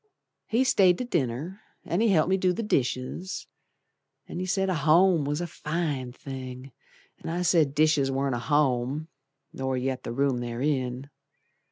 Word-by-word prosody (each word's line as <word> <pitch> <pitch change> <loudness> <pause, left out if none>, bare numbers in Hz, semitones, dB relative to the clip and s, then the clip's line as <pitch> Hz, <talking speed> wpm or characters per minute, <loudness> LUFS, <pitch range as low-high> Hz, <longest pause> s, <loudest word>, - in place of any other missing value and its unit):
He 235 +4 +2
stayed 185 -8 +4
to 250 - -3
dinner, 165 - -2 0.2
An' 175 +5 0
he 230 - +4
helped 180 -1 +3
me - - +5
do 185 -1 +2
the 230 - -3
dishes, 145 - -2 0.8
An' - - -6
he 185 - -3
said 195 +1 +1
a 185 - +1
home 165 0 +4
was 145 +3 -1
a - - -1
fine 150 -6 -3
thing, 130 0 -8 0.5
An' - - -6
I 175 +2 -1
said 160 -5 +3
dishes 150 -3 +3
warn't 135 0 0
a 120 - -1
home 145 +2 0 0.4
Nor 130 -1 -2
yet 130 0 -2
the - - -5
room 135 0 +1
they're 120 -1 -4
in. 130 -1 -1
150 Hz, 170 wpm, -27 LUFS, 130-175 Hz, 0.8 s, me